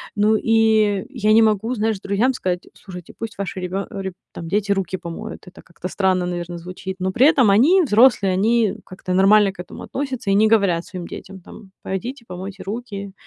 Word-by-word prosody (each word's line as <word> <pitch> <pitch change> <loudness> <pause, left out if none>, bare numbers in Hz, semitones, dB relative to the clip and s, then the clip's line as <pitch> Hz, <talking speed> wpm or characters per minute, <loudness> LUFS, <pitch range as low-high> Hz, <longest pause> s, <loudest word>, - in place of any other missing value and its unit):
Ну, 210 +1 +3
и 220 -3 +2
я 215 -6 +1
не 225 - +6
могу, 220 +2 +1
знаешь, 220 -2 -1
друзьям 205 +7 +1
сказать: 180 -6 -3
"Слушайте, 180 -3 -11
пусть 225 0 -6
ваши 195 -1 -4
ребё 185 +2 -3
реб 190 -2 -5 0.2
там, 165 - -7
дети 200 +3 0
руки 195 -1 -1
помоют". 170 +1 -8
Это 180 - -13
как-то 170 0 -8
странно, 185 -1 +1
наверно, 175 0 -4
звучит. 185 +2 -7
Но 190 +1 -1
при 255 +8 +4
этом 260 -8 +4
они, 280 - +5
взрослые, 225 - +4
они 215 +1 +2
как-то 185 -1 -6
нормально 195 +2 +5
к 195 - -24
этому 180 - -9
относятся 265 -6 -4
и - - +3
не 215 +2 +5
говорят 195 -6 +2
своим 180 -3 -7
детям 195 0 -9
там: 195 +2 -14
"Пойдите, 235 +7 -5
помойте 190 +2 -8
руки". 200 -1 -6
200 Hz, 190 wpm, -21 LUFS, 185-220 Hz, 0.2 s, не